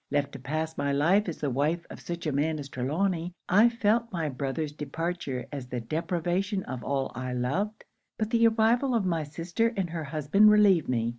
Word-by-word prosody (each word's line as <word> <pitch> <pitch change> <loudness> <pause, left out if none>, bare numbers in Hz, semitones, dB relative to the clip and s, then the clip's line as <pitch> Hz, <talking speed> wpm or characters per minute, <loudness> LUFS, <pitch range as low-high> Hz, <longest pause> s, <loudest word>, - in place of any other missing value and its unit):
Left 145 -1 0
to - - -8
pass 155 +4 -3
my 140 0 0
life 175 +8 +3
as 165 - -5
the 145 -3 0
wife 155 +6 0
of - - -9
such 170 0 -6
a 155 - 0
man 155 +3 0
as 145 -2 -7
Trelawny, 165 +7 -1
I 210 +6 +6
felt 230 0 +1
my 165 -5 -2
brother's 140 +3 -3
departure 150 -2 -4
as 140 -4 -6
the 125 -1 -3
deprivation 175 - -1
of 130 -2 -6
all 135 -1 -1
I 125 +1 -4
loved. 180 +13 -2 0.3
But 215 0 -2
the 230 -1 +5
arrival 230 +4 +2
of 215 -4 +1
my 170 -3 0
sister 170 +9 -1
and 180 -4 -1
her 165 -2 -4
husband 155 +8 +4
relieved 205 -6 +5
me. 115 -2 +1
160 Hz, 200 wpm, -28 LUFS, 140-195 Hz, 0.3 s, I